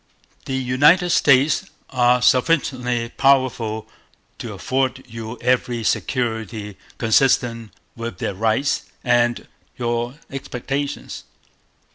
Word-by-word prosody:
The 135 - -3
United 145 +8 +3
States 140 +1 +4 0.3
are 125 -1 +3
sufficiently 125 -4 +2
powerful 125 -5 +1 0.5
to - - -6
afford 130 0 -1
you 115 0 -7
every 125 -2 0
security 110 -4 -2 0.2
consistent 115 -1 +2 0.2
with 115 -5 -6
their 100 - -3
rights 110 +7 0 0.2
and 120 -1 +1 0.3
your 120 +1 -2 0.2
expectations. 135 +1 -4
125 Hz, 90 wpm, -21 LUFS, 115-135 Hz, 0.5 s, States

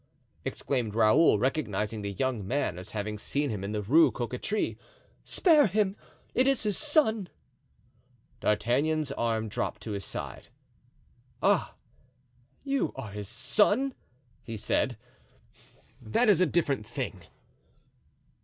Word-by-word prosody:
exclaimed 120 -6 -2
Raoul, 115 +5 +5
recognizing 110 -4 -1
the 100 0 -4
young 115 -2 -2
man 120 -8 -1
as 95 +3 -9
having 105 0 -4
seen 145 +5 -1
him 100 -3 -4
in 100 - -3
the 105 -1 -2
Rue 155 +11 +6
Cocatrix, 125 - -2 0.5
"spare 310 - +4
him! 200 0 +1 0.4
it 260 - +3
is 275 -2 +2
his 210 -2 +1
son!" 225 - +2 1.1
D'Artagnan's 140 +8 +1
arm 115 -4 -1
dropped 110 0 -3
to 110 - -5
his 100 -1 -3
side. - - -6 1.0
"Ah, - - +2 0.9
you 275 -1 0
are 120 -6 -7
his 105 -1 -6
son!" 205 - +2 0.5
he 115 -1 -7
said; - - 0 1.0
"that 125 - +2
is 190 -4 +5
a 185 - +5
different 145 -7 0
thing." 120 -6 -5
130 Hz, 125 wpm, -29 LUFS, -, 1.1 s, Rue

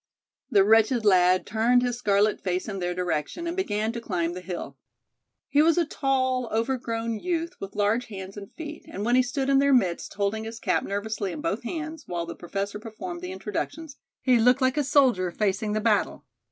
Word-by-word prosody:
The 200 -2 +5
wretched 225 +2 +4
lad 185 -2 +4
turned 235 +3 +3
his 245 -1 -1
scarlet 205 -2 +2
face 185 -1 -2
in 195 -2 -4
their 175 0 -2
direction 180 - -2
and 340 +1 -2
began 220 - -1
to 235 0 -6
climb 175 -6 -1
the 180 - -6
hill. 175 -6 -6 0.7
He 285 - +4
was 330 +1 +4
a 345 - +3
tall, 260 -4 0
overgrown 230 -1 -1
youth, 340 -1 -2
with 195 - -7
large 210 +4 +1
hands 195 -2 -8
and 200 -1 -9
feet, 305 -1 -8
and 200 +2 -4
when 240 +1 +3
he 255 - +6
stood 265 +2 -2
in 275 0 +4
their 280 -1 +4
midst, 180 -8 0
holding 205 +2 -1
his 225 +1 -7
cap - - +1
nervously 205 0 -3
in - - -6
both 330 +2 -1
hands, 315 +3 -5
while 170 -1 -3
the 170 - -6
Professor 200 +4 -4
performed 205 -6 -7
the 180 0 -5
introductions, 220 +10 -5 0.3
he 250 -3 +4
looked 250 +3 +5
like 260 -1 +2
a 295 - +1
soldier 255 -10 +3
facing 210 +2 -1
the 215 - +1
battle. 215 -2 +1
220 Hz, 200 wpm, -26 LUFS, 195-260 Hz, 0.7 s, he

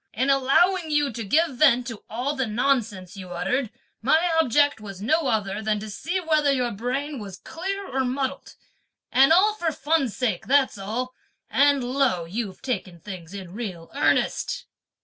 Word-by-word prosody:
(In 260 +6 +2
allowing 320 +6 +3
you 295 -2 +2
to 230 - -4
give 295 - +1
vent 250 -4 +5
to) 230 -4 -7
all 250 +6 -2
the 265 -3 -1
nonsense 215 -6 0
you 185 -2 -9
uttered 210 +8 -1 0.3
my 320 +8 +3
object 285 -3 +2
was 195 -3 -8
no 295 +8 +1
other 210 -3 -1
than 215 -1 0
to 215 0 -7
see 345 - -2
whether 310 -4 +2
your 250 -3 0
brain 255 +7 -3
was 195 -3 -8
clear 390 +4 -5
or 265 0 -1
muddled; 265 +2 -3 0.6
and 270 +3 +5
all 390 +6 +5
for 345 -6 -1
fun's 290 -6 0
sake, 215 -7 -1
that's 270 -5 +3
all; 240 +6 -3 0.4
and 280 -1 +4
lo, 250 -9 +1
you've 195 +2 -5
taken 185 -9 -3
things 185 -1 -9
in 185 -3 -8
real 190 -7 -6
earnest!" - - +1
250 Hz, 170 wpm, -25 LUFS, 210-285 Hz, 0.6 s, vent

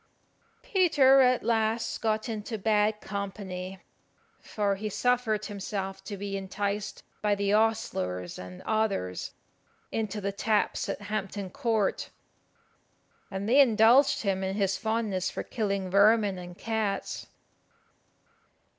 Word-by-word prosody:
Peter 290 -9 +5
at 250 -1 +3
last 225 0 0
got 220 -1 0
into 220 0 -4
bad 210 0 +1
company, 190 -2 -5 0.6
for 205 -2 -1
he 210 +2 -4
suffered 225 -1 +1
himself 195 -1 -5
to 200 +1 -6
be 200 0 -4
enticed 200 +1 -3 0.2
by 210 -1 +2
the 200 0 0
ostlers 95 - 0
and 90 0 -9
others 205 - -1 0.6
into 215 -2 -2
the 200 0 -2
taps 210 +1 0
at - - -3
Hampton 200 -2 -4
Court, 220 -4 0 1.2
and 195 +1 -4
they 265 +5 +7
indulged 250 +3 +5
him 195 -2 0
in 190 0 -2
his 195 -2 +1
fondness 220 -4 -1
for - - -5
killing 200 -5 -2
vermin 200 -1 +4
and 175 0 -9
cats. 220 -3 -2
210 Hz, 120 wpm, -28 LUFS, 195-220 Hz, 1.2 s, they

